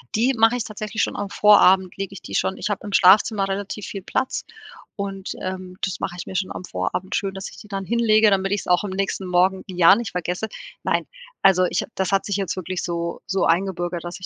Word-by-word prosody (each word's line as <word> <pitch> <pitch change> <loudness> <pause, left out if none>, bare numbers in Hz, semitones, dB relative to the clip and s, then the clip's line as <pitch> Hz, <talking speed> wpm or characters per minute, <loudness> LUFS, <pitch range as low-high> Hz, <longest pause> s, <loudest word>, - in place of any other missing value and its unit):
Die 240 +5 +3
mache 225 0 +4
ich 240 - -2
tatsächlich 215 0 -4
schon - - -2
am 200 -1 -4
Vorabend 190 -3 +5
lege 195 0 -4
ich 195 - -10
die - - -7
schon 190 - 0
ich 210 - -3
hab 205 - -3
im 205 -1 -7
Schlafzimmer 195 +2 +5
relativ 200 +1 -4
viel 195 - -6
Platz 260 +7 -2 0.5
und, 195 -2 -5
ähm, 185 -1 -6
das 190 - -2
mache 175 - -4
ich - - -6
mir 190 - -8
schon 190 0 -1
am - - -6
Vorabend 135 - -3
schön, 195 -1 -1
dass 190 - -6
ich - - -14
die 210 - -12
dann 195 -1 -4
hinlege, 220 -1 +4
damit 195 0 +1
ich's 205 -1 -1
auch 180 +2 +3
am 205 - -3
nächsten 190 0 -2
Morgen 185 +1 +2
ja 180 0 +6
nicht 235 0 -4
vergesse. 180 +4 -3 0.4
Nein, - - 0 0.4
also 185 -1 +5
ich 175 - 0
ha - - -10
das 190 0 -1
hat 195 - +2
sich 200 -3 -2
jetzt 195 -3 -2
wirklich 185 0 -4
so 170 -1 -3
so 190 0 +1
eingebürgert, 175 0 0
dass 175 +2 -7
ich 185 - -7
195 Hz, 235 wpm, -22 LUFS, 180-205 Hz, 0.5 s, ja